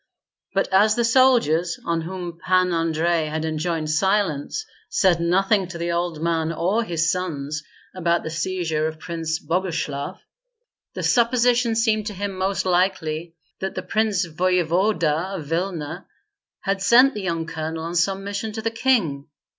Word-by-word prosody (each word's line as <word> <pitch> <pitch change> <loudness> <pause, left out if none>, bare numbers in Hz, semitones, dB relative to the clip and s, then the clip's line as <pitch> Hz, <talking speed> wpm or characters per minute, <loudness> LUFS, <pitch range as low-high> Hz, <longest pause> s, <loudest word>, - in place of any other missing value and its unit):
But 195 - +2
as 210 +3 +5
the 235 - +1
soldiers, 225 - +3
on 165 -1 0
whom 175 0 -6
Pan 185 -1 +2
Andrei 165 0 +1
had 155 +1 -3
enjoined 155 0 -2
silence, 190 - 0 0.2
said 180 -3 +3
nothing 190 +3 +2
to 175 -1 -7
the 170 0 -2
old 170 -2 -2
man 165 -1 0
or 185 +8 0
his 165 -4 0
sons 150 -5 -3 0.3
about 170 -2 0
the 160 - -5
seizure 165 -3 -1
of 160 0 -6
Prince 165 0 -3
Boguslav, 165 -6 -2 0.8
the - - -4
supposition 240 -1 +3
seemed 220 -2 +1
to 210 - -5
him 200 0 -3
most 190 +1 -1
likely 175 -3 0 0.2
that 190 0 -4
the - - -3
prince 215 -4 +1
voevoda 175 +1 +1
of 155 - -7
Vilna 165 0 -3 0.5
had 195 0 -1
sent 245 +8 +6
the 210 - -5
young 165 -3 -2
colonel 160 0 -4
on 165 +1 -4
some 190 +3 +1
mission 200 +2 -3
to 220 - -4
the 225 - 0
king. 220 - +1
175 Hz, 155 wpm, -23 LUFS, 160-200 Hz, 0.8 s, sent